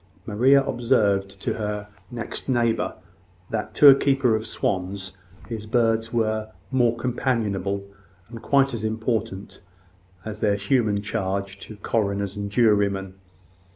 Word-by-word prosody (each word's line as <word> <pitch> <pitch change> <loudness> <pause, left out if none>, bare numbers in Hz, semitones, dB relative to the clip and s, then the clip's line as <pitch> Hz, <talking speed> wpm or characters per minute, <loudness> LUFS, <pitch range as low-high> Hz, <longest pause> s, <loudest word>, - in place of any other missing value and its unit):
Maria 130 +6 +4
observed 100 -7 +1
to - - -2
her 105 -1 -4 0.2
next 120 +2 -5
neighbour 120 -3 +1 0.6
that, 110 -1 -3
to 145 - +7
a 140 - +12
keeper 135 -4 +2
of 110 0 -3
swans, 95 0 -3 0.3
his 110 -2 -6
birds 115 -1 +1
were 110 -2 -1 0.2
more 120 -3 +2
companionable, 110 -6 -1 0.4
and 115 0 -10
quite 135 0 +2
as 115 -2 -4
important, 110 -3 -3 0.6
as 110 -1 -6
their 105 -2 +2
human 100 -1 +1
charge 100 0 -3
to 110 - -10
coroners 100 -2 -1
and 100 0 -4
jurymen. 100 -4 +2
110 Hz, 125 wpm, -24 LUFS, 100-120 Hz, 0.6 s, a